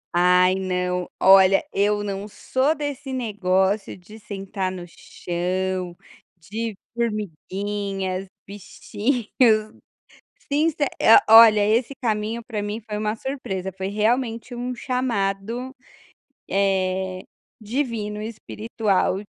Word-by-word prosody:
Ai, 180 Hz, +1 st, +5 dB
não, 180 Hz, -1 st, -2 dB
olha, 190 Hz, 0 st, +6 dB
eu 205 Hz, +1 st, +1 dB
não 200 Hz, 0 st, -4 dB
sou 260 Hz, +7 st, 0 dB
desse 285 Hz, -2 st, -5 dB
negócio 200 Hz, -5 st, 0 dB
de 210 Hz, +5 st, -14 dB
sentar 195 Hz, -2 st, -4 dB
no 180 Hz, -2 st, -7 dB
chão, 180 Hz, +1 st, -4 dB, 0.4 s
de 215 Hz, +5 st, -5 dB, 0.2 s
formiguinhas, 200 Hz, -3 st, -3 dB, 0.2 s
bichinhos. 215 Hz, +2 st, 0 dB, 0.8 s
Since 305 Hz, +2 st, +2 dB, 0.3 s
eh, 225 Hz, -, +8 dB
olha, 220 Hz, -2 st, +8 dB
esse 230 Hz, +6 st, +1 dB
caminho, 220 Hz, 0 st, -1 dB
pra 220 Hz, -2 st, -5 dB
mim, 210 Hz, +2 st, -4 dB
foi 210 Hz, -1 st, -6 dB
uma 215 Hz, 0 st, -1 dB
surpresa. 220 Hz, -7 st, -4 dB
Foi 190 Hz, +1 st, -5 dB
realmente 230 Hz, +3 st, 0 dB
um 245 Hz, +1 st, -4 dB
chamado, 235 Hz, -1 st, -2 dB, 0.8 s
eh, 190 Hz, -1 st, 0 dB, 0.4 s
divino 220 Hz, -3 st, -3 dB
e 215 Hz, -, -4 dB
espiritual 215 Hz, -3 st, -1 dB
210 Hz, 105 wpm, -23 LUFS, 190-230 Hz, 0.8 s, eh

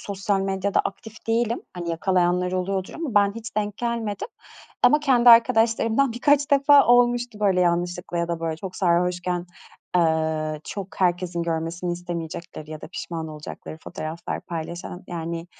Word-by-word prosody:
sosyal 195 Hz, 0 st, -1 dB
medyada 195 Hz, +1 st, 0 dB
aktif 220 Hz, +3 st, -8 dB
değilim. 230 Hz, +1 st, +1 dB
Hani, 175 Hz, -1 st, -4 dB
yakalayanlar 180 Hz, +1 st, +1 dB
oluyordur 185 Hz, +1 st, -2 dB
ama 310 Hz, -9 st, -4 dB
ben 200 Hz, -1 st, +4 dB
hiç 225 Hz, -2 st, -8 dB
denk 210 Hz, -1 st, -1 dB
gelmedim. 235 Hz, -, -3 dB, 0.5 s
Ama 300 Hz, -, +6 dB
kendi 250 Hz, -4 st, +4 dB
arkadaşlarımdan 230 Hz, +1 st, +4 dB
birkaç 285 Hz, +4 st, +2 dB
defa 280 Hz, 0 st, +6 dB
olmuştu, 240 Hz, -2 st, +3 dB
böyle, 195 Hz, -3 st, +3 dB
yanlışlıkla 175 Hz, 0 st, 0 dB
ya 170 Hz, 0 st, -1 dB
da, 170 Hz, -1 st, -3 dB
böyle, 165 Hz, -1 st, -2 dB
çok 185 Hz, +3 st, -7 dB
sarhoşken, 180 Hz, 0 st, 0 dB, 0.5 s
eee, 160 Hz, -2 st, +1 dB
çok 195 Hz, -1 st, -7 dB
herkesin 175 Hz, -1 st, +1 dB
görmesini 170 Hz, +1 st, -2 dB
istemeyecekleri 170 Hz, -2 st, -6 dB
ya 155 Hz, -1 st, -7 dB
da -, -, -9 dB
pişman 165 Hz, -2 st, -5 dB
olacakları 155 Hz, +1 st, -8 dB
fotoğraflar 160 Hz, +2 st, -5 dB
paylaşan. 170 Hz, +1 st, -6 dB
Yani, 170 Hz, 0 st, -5 dB
180 Hz, 140 wpm, -24 LUFS, 170-225 Hz, 0.5 s, Ama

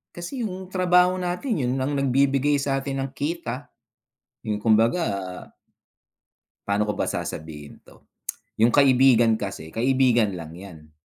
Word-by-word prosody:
Kasi 175 Hz, +10 st, -6 dB
yung 190 Hz, -4 st, -5 dB
trabaho 180 Hz, 0 st, +3 dB
natin 180 Hz, -, -2 dB
yun -, -, 0 dB
lang 135 Hz, +2 st, -1 dB
nagbibigay 140 Hz, +1 st, +2 dB
sa'tin 135 Hz, 0 st, -2 dB
ng 135 Hz, 0 st, -4 dB
kita, 145 Hz, -2 st, -4 dB, 0.7 s
yung 105 Hz, -2 st, -2 dB
kumbaga. 105 Hz, -, 0 dB, 1.2 s
Paano 100 Hz, +1 st, +1 dB
ko 105 Hz, -, 0 dB
ba -, -, -1 dB
sasabihin 75 Hz, -2 st, -6 dB
'to, -, -, -20 dB, 0.6 s
yung 115 Hz, +1 st, +4 dB
kaibigan 130 Hz, -5 st, +5 dB
kasi, 95 Hz, -6 st, -6 dB
kaibigan 120 Hz, -3 st, +2 dB
lang 80 Hz, -1 st, -9 dB
'yan. 80 Hz, -5 st, -13 dB
130 Hz, 125 wpm, -24 LUFS, 105-145 Hz, 1.2 s, kaibigan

